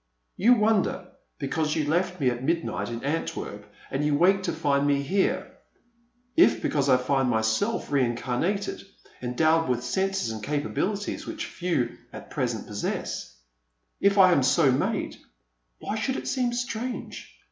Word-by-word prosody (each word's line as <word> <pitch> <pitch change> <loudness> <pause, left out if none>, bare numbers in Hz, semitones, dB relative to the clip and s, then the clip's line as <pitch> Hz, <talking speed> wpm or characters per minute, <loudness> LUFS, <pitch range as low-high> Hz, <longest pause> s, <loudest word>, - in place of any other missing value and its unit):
You 235 +6 +5
wonder, 215 -2 +1 0.3
because 150 +2 -1
you 155 - 0
left 180 +4 0
me 130 -4 +3
at 120 +1 -5
midnight 135 - -1
in 120 0 -5
Antwerp 105 -8 -4 0.2
and 135 +2 -1
you 150 -1 +2
wake 190 +4 +4
to - - -1
find 145 -3 +1
me 140 -1 +2
here. 190 +7 0 0.8
If, 345 - +5
because 140 -2 0
I 130 - +6
find 130 0 +1
myself 110 - 0
rein 130 -4 +2
carnated, 170 - -2 0.4
endowed 155 +6 +2
with 125 -1 0
senses 190 0 -1
and 110 -1 -6
capabilities 180 - -2
which - - -4
few 170 -9 -2
at - - -10
present - - -2
possess; - - -4 0.3
— - - -49
if 200 - -3
I 185 -2 +7
am 145 - +4
so 135 +2 +4
made, 130 - -1 0.6
why 215 - -4
should 260 +4 -1
it - - -5
seem 255 -3 0
strange 240 0 -5
150 Hz, 155 wpm, -26 LUFS, 125-195 Hz, 0.8 s, I